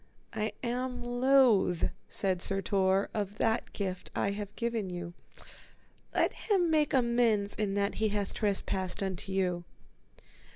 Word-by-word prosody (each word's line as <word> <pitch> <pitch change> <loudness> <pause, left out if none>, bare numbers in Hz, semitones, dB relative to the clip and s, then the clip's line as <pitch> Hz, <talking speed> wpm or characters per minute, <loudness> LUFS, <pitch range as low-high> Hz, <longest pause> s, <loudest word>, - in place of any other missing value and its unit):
I 215 -1 -1
am 250 +1 -2
loath, 245 -7 +4 0.3
said 185 -3 -1
Sir 195 +1 +1
Tor, 195 -1 +2
of 205 -1 -3
that 225 +1 0
gift 185 -3 -4
I 200 - +1
have 205 0 -6
given 230 -4 -2
you; 175 -1 -6 1.0
let - - +2
him 370 -6 +1
make 305 -2 +3
amends 235 -5 +2
in 205 -2 -1
that 200 0 +1
he 220 - +3
hath 205 -1 -2
trespassed 195 -2 -1
unto 190 0 -4
you. 180 -2 0
205 Hz, 135 wpm, -31 LUFS, 190-235 Hz, 1.0 s, loath